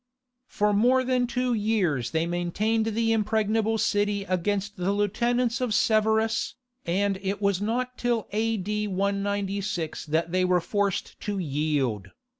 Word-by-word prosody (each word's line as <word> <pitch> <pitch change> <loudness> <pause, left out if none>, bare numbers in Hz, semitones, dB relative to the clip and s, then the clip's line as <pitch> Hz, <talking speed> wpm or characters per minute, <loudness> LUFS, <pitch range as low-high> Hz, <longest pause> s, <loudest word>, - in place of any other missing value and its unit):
For 210 0 +1
more 250 +5 +4
than 250 -1 +1
two 250 +1 0
years 200 - 0
they 160 0 0
maintained 195 +6 0
the 225 +1 +1
impregnable 220 0 +1
city 205 -1 +1
against 200 +2 -1
the 185 0 -1
lieutenants 235 +4 0
of 240 -4 0
Severus, 220 +1 +2 0.3
and 195 +2 +1
it 195 +1 -2
was 200 -2 +1
not 250 +4 -2
till 240 -3 0
A.D. 210 -1 -1
196 200 -3 -2
that 165 +2 0
they 185 0 +2
were 180 -1 +3
forced 200 +2 -2
to 205 -1 -3
yield. 145 - -1
205 Hz, 135 wpm, -26 LUFS, 185-225 Hz, 0.3 s, more